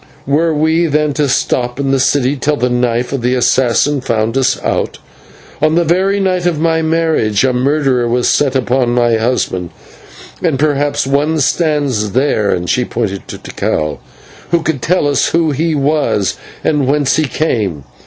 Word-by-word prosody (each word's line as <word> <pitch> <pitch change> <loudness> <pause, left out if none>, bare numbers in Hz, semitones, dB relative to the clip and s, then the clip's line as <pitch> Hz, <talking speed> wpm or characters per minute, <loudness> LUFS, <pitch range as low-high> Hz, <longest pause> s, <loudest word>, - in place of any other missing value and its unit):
Were 155 +4 +1
we, 160 +2 +1
then, 150 -1 0
to 145 -1 0
stop 125 -1 -1
in 135 -1 0
the 135 - +2
city 135 +1 +1
till 150 +2 0
the 125 -1 0
knife 125 +1 0
of 135 - -2
the 125 +2 +1
assassin 130 +3 +2
found 115 -1 -1
us 135 -1 +1
out? - - -1 0.6
On 155 +1 +2
the 170 - +3
very 190 +5 +1
night 185 -2 0
of 165 -4 -1
my 160 0 +1
marriage 160 -10 +1
a 130 -1 +2
murderer 130 -1 +1
was 120 +1 +1
set 140 -2 +1
upon 125 -1 +1
my 120 -2 +2
husband, 110 -7 -1 0.7
and 160 -6 0
perhaps 145 0 0
one 145 +4 0
stands 140 - 0
there" 125 -5 +1
and 90 -2 -1
she 125 - +1
pointed 105 -5 -4
to - - -7
Tikal 75 -1 -3 0.5
"who 170 -1 +1
could 155 -5 -2
tell 165 +1 +1
us 145 - +1
who 165 -2 +1
he 160 +3 -1
was 135 -9 0 0.3
and 145 -4 +1
whence 145 0 +1
he 155 - +2
came. 105 - -2
140 Hz, 175 wpm, -14 LUFS, 120-155 Hz, 0.7 s, the